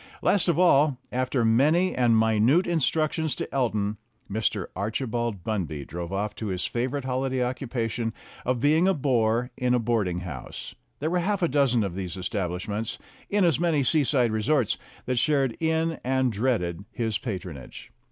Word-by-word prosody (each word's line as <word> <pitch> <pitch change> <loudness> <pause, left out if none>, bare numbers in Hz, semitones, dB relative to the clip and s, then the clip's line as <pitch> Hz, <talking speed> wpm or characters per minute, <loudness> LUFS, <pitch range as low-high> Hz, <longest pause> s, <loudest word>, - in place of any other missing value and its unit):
Last 200 - +3
of 170 -3 +2
all, 150 -6 +4
after 130 -1 0
many 150 +11 +3
and 120 -3 +3
minute 110 - +3
instructions 160 -1 0
to - - -4
Elton, 110 -6 0 0.3
Mr. 105 -2 -1
Archibald 110 0 -2
Bunby 85 -10 -3
drove 85 +4 -6
off 100 +2 -2
to 110 - -4
his 90 -2 -2
favorite 130 +3 -2
holiday 130 0 0
occupation 120 -3 -2 0.3
of 125 -1 0
being 155 +7 +3
a 195 - +3
bore 125 -3 +1
in 125 0 +1
a - - +2
boarding 105 -7 0
house 80 -9 -7 0.2
there 155 +3 -2
were 180 - +2
half 195 +2 0
a - - +4
dozen 135 -6 +2
of 95 -3 -3
these 95 -1 -5
establishments, 100 +2 -3 0.3
in 200 -2 +3
as 165 -3 +2
many 165 -5 +2
seaside 130 -4 +2
resorts, 110 +3 +1 0.3
that 125 -1 +1
shared 135 -5 +2
in 160 0 0
and 130 -1 +1
dreaded 100 -6 -1
his 110 -3 -1
patronage. 90 - -7
120 Hz, 160 wpm, -26 LUFS, 105-145 Hz, 0.3 s, all